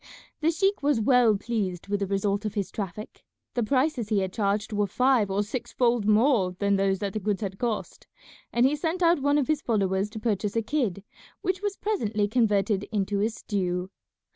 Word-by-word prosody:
The 315 - +2
sheik 390 +4 +1
was 285 -4 +2
well 230 -2 +4
pleased 195 -5 -3
with 205 0 -1
the 200 - -1
result 200 +1 0
of 215 - -4
his 200 -3 -2
traffic. 210 +1 -6 0.3
The 240 - 0
prices 255 -1 0
he 215 - +2
had 190 -1 -3
charged 210 +1 -1
were 205 -1 +1
five 250 -1 +2
or 195 +2 +1
six 230 +4 -5
fold 235 -4 +1
more 215 -4 +3
than 200 0 +2
those 195 0 +1
that 195 0 -3
the 215 - -2
goods 205 0 -1
had 195 -2 -4
cost, 235 -3 -3 0.4
and 240 +1 +3
he 275 +3 +3
sent 330 +4 -2
out 335 -1 +4
one 285 +1 +3
of 285 - +1
his 310 -1 +1
followers 195 -4 0
to 220 0 -7
purchase 210 -2 -1
a 230 - +1
kid, 215 - -1 0.4
which 370 0 -1
was 410 -1 -2
presently 220 - -1
converted 205 -3 +1
into 200 -1 0
a 215 - +2
stew. 185 -4 -3
215 Hz, 200 wpm, -26 LUFS, 200-255 Hz, 0.4 s, well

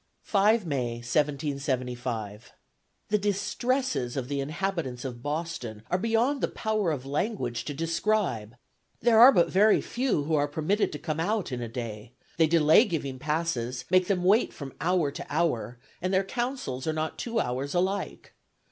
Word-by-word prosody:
"5 210 +1 +3
May, 130 -6 -1
1775. 125 -4 -2 0.6
"The 210 - +2
distresses 205 - -1
of 130 -1 -3
the 140 -1 -1
inhabitants 155 -4 -3
of 120 -2 -6
Boston 145 -7 -4
are 180 - +2
beyond 230 +6 +1
the - - +2
power 215 -4 -1
of 140 -5 -3
language 140 - -2
to 145 - -4
describe; 165 - -1 0.4
there 230 -1 +4
are 250 +4 +10
but 175 -9 +3
very 210 +3 +5
few 245 - -1
who 160 +2 -2
are 145 -1 +3
permitted 160 +8 0
to - - -3
come 155 0 -3
out 205 0 -1
in 125 -1 -3
a 120 - -3
day; 115 -1 -6 0.2
they 165 -1 +5
delay 160 +4 +6
giving 140 -8 -3
passes, 130 -5 -2
make 185 -1 +4
them 185 -3 0
wait 205 +6 +4
from 140 -3 -7
hour 170 -4 +1
to - - -6
hour, 145 -6 0 0.2
and 185 +1 -1
their 190 0 +3
counsels 240 - -3
are 160 - +1
not 155 0 -3
two 235 -1 -1
hours 135 - -2
alike. 190 +3 -2
155 Hz, 165 wpm, -27 LUFS, 130-200 Hz, 0.6 s, are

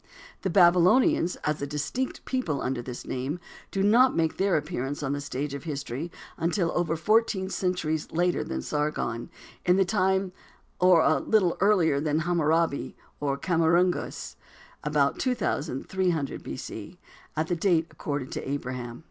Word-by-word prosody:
The 190 - -1
Babylonians, 180 +1 +5
as 150 0 -1
a 140 - -2
distinct 155 - -3
people 175 - -1
under 125 -1 -2
this 125 0 -7
name, 135 +7 -3 0.3
do 195 - -1
not 240 +6 +5
make 160 -1 +1
their 195 -2 +2
appearance 145 -2 -3
on 135 0 -1
the 145 - -3
stage 140 0 -4
of 140 - -6
history 145 +1 -4 0.3
until 170 +1 0
over 170 -2 0
fourteen 195 +2 +2
centuries 165 -5 -1
later 175 +2 +1
than 65 0 -4
Sargon, 150 - -2 0.3
in 180 - +4
the 195 0 +3
time 190 0 +1 0.5
or 180 -2 +6
a 155 -3 +3
little 190 -2 +2
earlier 180 -8 +4
than 150 0 0
Hammurabi, 165 -2 +1 0.2
or 140 -1 -1
Khammuragas, 170 +3 +1 0.5
about 150 -2 +1
2300 175 - -1
B. - - -6
C., - - -8 0.4
at 155 - +1
the 175 - -1
date 170 -2 +2
accorded 140 -3 -4
to - - -4
Abraham. 125 -3 -4
165 Hz, 150 wpm, -27 LUFS, 145-185 Hz, 0.5 s, or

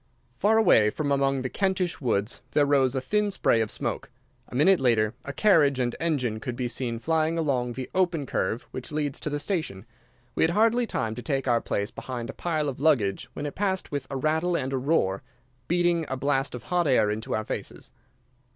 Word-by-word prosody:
Far 220 +2 +4
away, 110 - +5
from 145 +6 -2
among 135 -1 +1
the - - -1
Kentish 190 +1 -1
woods 110 -3 -1
there 145 - +4
rose 135 -2 +2
a 130 - 0
thin 210 +8 0
spray 150 - +2
of 110 - -1
smoke. - - -3 0.4
A - - -9
minute 175 +8 +5
later 115 -4 +2
a 140 - -5
carriage 145 -7 +3
and 120 -1 0
engine 130 -10 0
could 120 +2 -5
be 125 0 -2
seen 120 -1 -2
flying 160 +5 0
along 130 -6 0
the 130 +1 -5
open 175 -6 +1
curve 115 -1 -2
which 130 +2 -6
leads 150 -2 -2
to - - -3
the 145 0 -2
station. 145 - -3 0.5
We - - -2
had 160 - +4
hardly 230 +3 +3
time 110 - -2
to 125 - -7
take 135 -1 -2
our 120 -2 +3
place 100 0 -2
behind 120 -3 -6
a - - -18
pile 155 -4 -1
of 135 -3 -4
luggage 130 -11 +1
when 145 - -5
it 145 - -4
passed 190 -1 -2
with 145 -1 -3
a 135 - -3
rattle 160 +5 +1
and 130 +1 -3
a - - +1
roar, 125 -9 +1 0.5
beating 175 -1 +2
a 130 - -2
blast 135 0 0
of 120 - -8
hot 175 -2 0
air 110 -6 +3
into 110 +2 -3
our 110 - -2
faces. - - -6
140 Hz, 210 wpm, -26 LUFS, 120-165 Hz, 0.5 s, away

